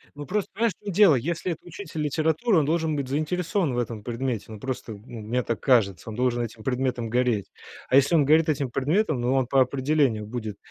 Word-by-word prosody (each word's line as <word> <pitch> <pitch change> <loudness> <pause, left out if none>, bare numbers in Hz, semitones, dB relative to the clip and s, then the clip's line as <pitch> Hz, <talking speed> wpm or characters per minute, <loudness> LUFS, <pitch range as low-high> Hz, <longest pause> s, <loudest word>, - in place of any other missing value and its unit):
Ну, 145 - -7
просто 200 +6 -2
понимаешь, 230 -3 +1
в 210 - -26
чём 200 - -3
дело, 195 -7 +6
если 170 +7 -2
это 165 - -6
учитель 170 -3 -7
литературы, 160 - +1
он 145 - +1
должен 160 0 0
быть 140 -2 -2
заинтересован 160 +2 -1
в - - -2
этом 115 -3 -3
предмете. 120 -1 -3
Ну, 105 - -8
просто, 130 -3 -5
ну, 110 +2 -10
мне 120 +3 -1
так 115 - -2
кажется, 110 - +2
он 105 - -6
должен 120 -1 +1
этим 110 -1 -8
предметом 125 -2 -1
гореть. 120 -5 0 0.4
А 130 - +3
если 140 +5 +5
он 150 - +4
горит 155 +3 +4
этим 140 -3 0
предметом, 150 - +1
ну, 125 +2 +1
он 130 -2 +1
по 135 0 +4
определению 130 -4 +1
будет 110 -2 -5
135 Hz, 220 wpm, -25 LUFS, 120-160 Hz, 0.4 s, дело